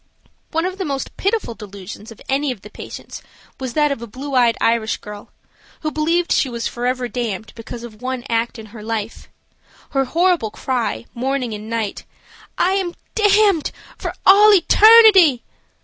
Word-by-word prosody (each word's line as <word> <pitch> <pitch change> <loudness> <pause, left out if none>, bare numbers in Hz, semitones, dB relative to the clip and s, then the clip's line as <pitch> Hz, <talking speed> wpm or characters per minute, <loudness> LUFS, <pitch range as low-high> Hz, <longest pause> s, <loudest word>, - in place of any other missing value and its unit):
One 325 +2 -1
of 375 +1 -4
the - - -1
most 275 -5 -4
pitiful 400 - -1
delusions 210 0 -10
of 225 - -13
any 275 +1 0
of 230 -6 -8
the 210 - -13
patients - - -9 0.4
was 260 -3 -5
that 295 -1 +2
of 275 - -3
a 235 - -7
blue 270 +6 -7
eyed 240 -3 +3
Irish 230 -1 +1
girl, 210 -1 -10 0.5
who 310 - -2
believed 335 +3 0
she 270 - +2
was 235 -1 -4
forever 250 +1 -2
damned 230 -4 -4
because 230 +1 -9
of 225 -2 -11
one 255 -1 -3
act 230 +1 -1
in 220 - -9
her 220 - -9
life. 220 0 -5 0.6
Her 270 -2 +1
horrible 335 -4 +1
cry, 225 - -3
morning 255 -1 -2
and 210 +1 -7
night, 225 -3 -3 0.5
"I 365 - +2
am 380 -3 -1 0.2
damned 415 -5 +3 0.2
for - - -5
all 415 +2 +8
eternity!" 395 - +7
255 Hz, 165 wpm, -20 LUFS, 230-335 Hz, 0.6 s, all